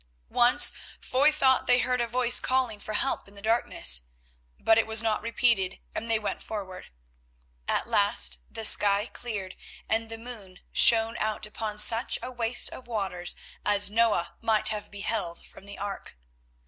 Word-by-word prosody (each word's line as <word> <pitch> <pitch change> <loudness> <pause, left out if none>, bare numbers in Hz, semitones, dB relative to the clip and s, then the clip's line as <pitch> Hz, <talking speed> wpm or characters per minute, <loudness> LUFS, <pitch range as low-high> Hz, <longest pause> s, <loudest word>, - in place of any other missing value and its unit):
Once 240 +1 +6 0.3
Foy 280 +4 +1
thought 265 -4 +1
that 250 - +4
he 245 - +3
heard 250 0 -1
a 235 - -2
voice 245 +1 +2
calling 255 -5 -2
for 215 - -7
help 270 0 -2
in 200 - -18
the - - -12
darkness, 220 - +1 0.6
but 225 0 +3
it 225 - -1
was 220 0 +2
not 220 -2 -1
repeated 220 -4 -1 0.2
and 230 - -5
they 225 - +2
went 210 -1 -5
forward. 195 -4 -8 0.8
At - - -2
last - - +2
the 225 - -2
sky 205 0 +5
cleared 210 -6 -8 0.3
and 225 0 -2
the 225 - -7
moon 220 -6 -11
shone 225 0 +5
out 215 0 -2
upon 210 0 -7
such 225 +3 +5
a 255 - -6
waste 240 -1 +1
of 255 - -12
waters 195 -6 -3 0.3
as 205 0 +2
Noah 220 -6 0
might 220 -2 +1
have 210 -1 -5
beheld 200 -3 -5
from 195 - -15
the 200 - -8
ark. 200 - -8
220 Hz, 170 wpm, -26 LUFS, 205-235 Hz, 0.8 s, Once